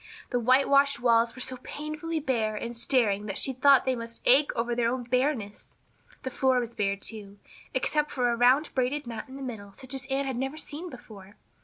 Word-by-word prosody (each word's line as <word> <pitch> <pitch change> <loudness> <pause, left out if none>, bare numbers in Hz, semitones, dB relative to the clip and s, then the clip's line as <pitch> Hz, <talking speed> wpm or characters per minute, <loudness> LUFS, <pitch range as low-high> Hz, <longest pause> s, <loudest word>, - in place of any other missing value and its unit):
The 245 - +1
whitewashed 275 +3 +4
walls 230 -1 +3
were 255 - -9
so 260 -1 -2
painfully 310 +3 -4
bare 230 -7 -1
and 235 +3 -5
staring 225 -4 +1
that 195 - -3
she 265 - +1
thought 275 +1 +5
they 260 -1 +1
must 230 -1 -6
ache 280 +4 +6
over 235 +1 -1
their 235 -1 +1
own 255 0 -3
bareness. 250 -4 -2 0.5
The 260 - -4
floor 260 0 +2
was 235 -1 -4
bare, 200 -2 0
too, 205 -1 -6 0.4
except 300 +3 +1
for 245 -2 0
a - - 0
round 255 +6 +3
braided 265 +3 -1
mat 235 +3 -7
in 260 - -10
the 275 - -7
middle 205 -6 -7
such 260 +4 -8
as 265 -1 -3
Anne 270 +1 -1
had 265 -3 -3
never 270 +4 -3
seen 315 +3 -6
before. 215 - -13
250 Hz, 205 wpm, -27 LUFS, 230-275 Hz, 0.5 s, ache